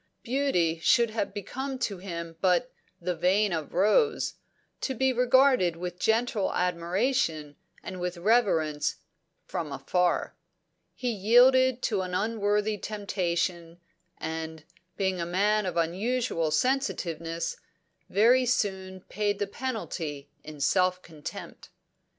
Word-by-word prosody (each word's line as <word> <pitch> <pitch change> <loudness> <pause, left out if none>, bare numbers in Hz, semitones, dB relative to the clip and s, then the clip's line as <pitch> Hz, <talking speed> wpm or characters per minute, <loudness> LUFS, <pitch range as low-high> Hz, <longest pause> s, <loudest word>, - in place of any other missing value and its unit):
Beauty 230 -11 +1
should 225 +7 +3
have 220 -2 -2
become 265 +6 -5
to 210 -7 -3
him 170 -3 -6
but 185 +7 +2 0.3
the 180 +1 -2
"vein 190 +4 +2
of 160 -3 -3
rose," 435 - +2 0.5
to 265 - -2
be 265 +2 +2
regarded 250 -7 +4
with 180 +1 -6
gentle 225 -2 +1
admiration 175 - 0 0.3
and 185 - -7
with 180 0 -3
reverence, 170 -7 +2 0.5
from 155 -3 -4
afar. 175 +6 0 0.6
He 250 -1 -2
yielded 250 +4 +5
to 205 -4 +1
an 180 -1 -4
unworthy 210 0 0
temptation, 175 -5 -2 0.4
and, 160 0 -5 0.3
being 190 -2 0
a - - 0
man 205 +3 +1
of 180 - -3
unusual 185 +1 0
sensitiveness, 170 - -1 0.5
very 245 +6 +4
soon 190 -5 -1
paid 205 +1 -2
the 205 - -1
penalty 175 - -5
in 150 -2 -9
self 185 +4 +2
contempt. 155 -3 -9
190 Hz, 115 wpm, -28 LUFS, 170-230 Hz, 0.6 s, yielded